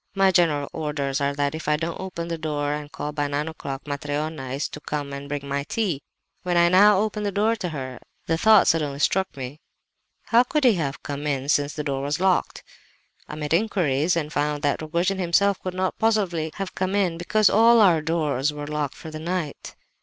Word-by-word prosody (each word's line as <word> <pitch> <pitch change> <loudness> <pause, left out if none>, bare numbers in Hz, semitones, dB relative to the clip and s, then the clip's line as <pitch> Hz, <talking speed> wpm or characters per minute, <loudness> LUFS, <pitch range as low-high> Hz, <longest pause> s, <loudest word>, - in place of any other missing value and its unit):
My 195 -1 +4
general 155 -6 +2
orders 145 -3 -2
are 140 0 0
that 145 0 0
if 160 -1 -6
I 150 0 +3
don't 165 +1 -4
open 180 -3 -5
the 165 -1 -3
door 145 -2 -1
and 150 0 -6
call, 150 - -4
by 145 -1 -1
nine 145 +2 -2
o'clock, 140 -4 -6
Matreona 145 0 -3
is 140 - -2
to - - -8
come 145 -2 -4
and 140 +1 -7
bring 140 -1 -4
my 140 0 -1
tea. 175 -4 -2 0.4
When 180 -1 0
I 170 0 +5
now 200 +3 +6
opened 210 +1 -1
the - - -1
door 215 +3 +2
to 180 -4 -3
her, 130 -5 -6 0.3
the 165 - +1
thought 215 +3 +5
suddenly 150 -4 +1
struck 190 +3 0
me—how 145 - -3
could 300 +3 0
he 245 -3 +6
have 145 -7 -3
come 145 +1 -4
in, 140 -1 -2
since 145 0 +2
the 150 - -3
door 135 -2 -2
was 145 +2 -2
locked? 185 -1 +1 0.7
I - - -6
made 150 0 -3
inquiries 170 -5 +1
and 155 -2 -2
found 145 0 -1
that 145 +1 +1
Rogojin 170 +5 -1
himself 190 +3 +2
could 185 -1 -5
not 185 0 -2
possibly 195 -8 +1
have 195 -1 -5
come 190 +1 -1
in, 180 -5 +1
because 210 +4 +3
all 230 +2 +6
our 180 -7 +5
doors 150 -3 0
were 145 0 -6
locked 150 -2 -3
for 160 - -9
the 155 - -6
night. 170 -2 -4
155 Hz, 210 wpm, -24 LUFS, 145-185 Hz, 0.7 s, now